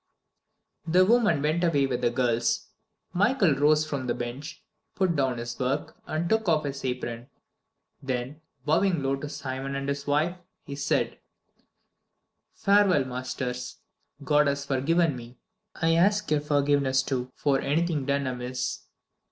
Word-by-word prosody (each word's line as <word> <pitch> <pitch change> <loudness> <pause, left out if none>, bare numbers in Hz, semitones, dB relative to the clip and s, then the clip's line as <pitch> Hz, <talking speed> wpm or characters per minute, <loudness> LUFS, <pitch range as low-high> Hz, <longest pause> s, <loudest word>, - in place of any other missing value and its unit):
X 160 - -3
The 185 +1 +6
woman 210 -9 +3
went 155 +4 +1
away 145 -5 +3
with 125 -2 -2
the - - +3
girls. 120 -1 0 0.4
Michael 205 - +3
rose 150 +2 +3
from 140 -4 -4
the 120 - 0
bench, 130 +6 -6 0.3
put 185 -3 +1
down 135 -4 +1
his 120 0 -6
work, 135 +3 -1
and 160 +2 -1
took 220 0 +1
off 155 -2 +2
his 140 -1 -5
apron. 125 -1 -4 0.7
Then, 130 +2 -4 0.2
bowing 165 +1 +2
low 135 0 +1
to 145 +1 -6
Simon 135 -2 -5
and 140 0 -3
his 140 0 -3
wife, 155 +5 +1 0.3
he 140 - -7
said: 140 0 -1 1.4
"Farewell, 200 -8 +4
masters. 125 0 -4 0.5
God 150 +1 +3
has 140 0 -1
forgiven 150 +3 +1
me. 120 0 -10 0.4
I 165 0 +2
ask 200 +3 +2
your 150 -1 +3
forgiveness, 140 -2 +2
too, 130 -2 -3
for 140 -2 +1
anything 150 -1 0
done 140 0 +1
amiss." 125 0 -3
140 Hz, 145 wpm, -27 LUFS, 130-160 Hz, 1.4 s, The